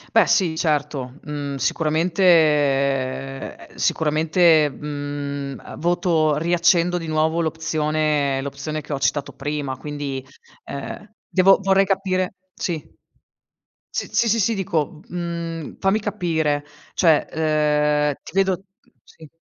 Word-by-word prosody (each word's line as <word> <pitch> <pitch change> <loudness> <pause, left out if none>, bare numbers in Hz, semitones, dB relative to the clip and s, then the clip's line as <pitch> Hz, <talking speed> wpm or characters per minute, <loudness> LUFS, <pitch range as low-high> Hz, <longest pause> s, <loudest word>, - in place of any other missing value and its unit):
Beh - - +6
sì 175 -5 +2
certo. 145 -5 -1
Mhmm, 145 -2 -4
sicuramente 160 +5 0
ehm, 140 -5 +2
sicuramente, 160 0 +3
mhmm, 145 -1 -5
ehm, - - -10
voto 170 -3 +2
riaccendo 175 +2 +2
di 165 - -6
nuovo 160 +1 +1
l'opzione 155 -3 0
l'opzione 140 +2 -4
che 150 - -6
ho 140 - -2
citato 140 +1 0
prima, 145 -1 -3
quindi, 140 -1 -5 0.4
ehm, 170 +9 -7
devo 190 +1 +5
vorrei 195 0 +4
capire 190 -1 0 0.2
sì. 170 -3 -2 1.1
Sì, - - -3
sì, 230 - +2
sì, 230 +2 +2
sì, 225 +2 +2
dico, 170 -6 -2
mhmm, 170 -2 -5
fammi 195 +3 +2
capire. 165 -8 -1 0.3
Cioè, 160 -4 +4
ehm, 150 -1 +2
ti - - -11
vedo 190 -1 +1 0.2
mh, - - -29
sì. 160 -2 -16
155 Hz, 120 wpm, -22 LUFS, 145-175 Hz, 1.1 s, Beh